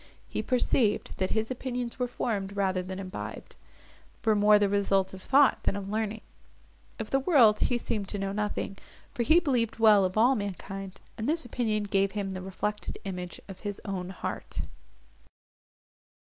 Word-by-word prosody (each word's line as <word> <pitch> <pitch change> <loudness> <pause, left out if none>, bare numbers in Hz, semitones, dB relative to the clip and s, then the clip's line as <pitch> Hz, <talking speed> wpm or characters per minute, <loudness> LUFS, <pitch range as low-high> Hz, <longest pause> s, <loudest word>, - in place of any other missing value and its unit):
He - - -3
perceived, 245 -3 +1
that 185 -1 0
his 220 +2 -1
opinions 250 -1 -4
were 250 - +1
formed, 200 -5 -2
rather 190 -2 +1
than 185 +1 -6
imbibed; 190 -1 -7 0.7
were 220 - +5
more 210 0 +6
the 205 -1 +3
result 195 -1 +1
of 190 - -9
thought, 275 +4 +4
than - - 0
of 200 -1 -5
learning. 215 0 -2 0.8
Of 225 -4 -6
the 270 - +3
world 260 -8 +5
he 245 - +2
seemed 210 -4 -3
to 205 - -3
know 195 0 -2
nothing; 205 -1 -3 0.3
for - - -2
he 315 +8 +6
believed 250 -10 0
well 215 -3 +6
of 185 +2 -1
all 240 +5 +6
mankind, 195 -3 -5 0.2
and 220 +5 -1
this 320 -3 +1
opinion 220 -3 -1
gave 195 -1 +1
him 200 -2 -2
the 185 -1 -5
reflected 210 +3 -3
image 180 -2 -5
of 190 -2 -9
his 205 -1 -5
own 185 -3 -3
heart. 190 - -5
210 Hz, 170 wpm, -28 LUFS, 195-235 Hz, 0.8 s, more